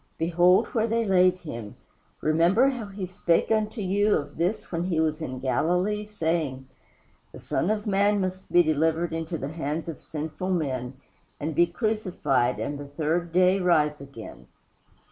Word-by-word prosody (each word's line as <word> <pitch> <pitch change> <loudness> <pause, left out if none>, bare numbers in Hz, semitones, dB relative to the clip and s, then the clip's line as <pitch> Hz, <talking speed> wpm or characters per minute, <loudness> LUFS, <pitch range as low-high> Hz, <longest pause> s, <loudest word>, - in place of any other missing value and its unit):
Behold 175 +2 +4
where 225 -1 0
they 230 0 0
laid 185 -2 +4
him. 115 - -8 0.5
Remember 170 - +4
how 245 -6 -4
he 195 -1 -5
spake 180 +1 0
unto 215 0 0
you 205 +2 +2
of 145 0 -4
this 180 +6 -1
when 170 0 -1
he 170 -4 0
was 155 0 0
in 130 -5 -4
Galilee, 180 +10 0
saying, 160 -9 -2 0.6
The - - -11
Son 180 - -1
of 210 -1 -1
man 205 0 +2
must 185 0 -4
be 175 - +6
delivered 160 +2 +1
into 165 +1 -3
the 135 -1 -4
hands 155 0 -4
of 165 - -6
sinful 155 +4 -5
men 135 -8 -2 0.4
and 155 +2 -3
be 170 +3 +4
crucified, 175 - 0
and 145 0 -3
the 145 - -7
third 160 +4 -1
day 185 +2 +4
rise 150 -5 +2
again." 135 -5 -11
170 Hz, 165 wpm, -26 LUFS, 150-195 Hz, 0.6 s, be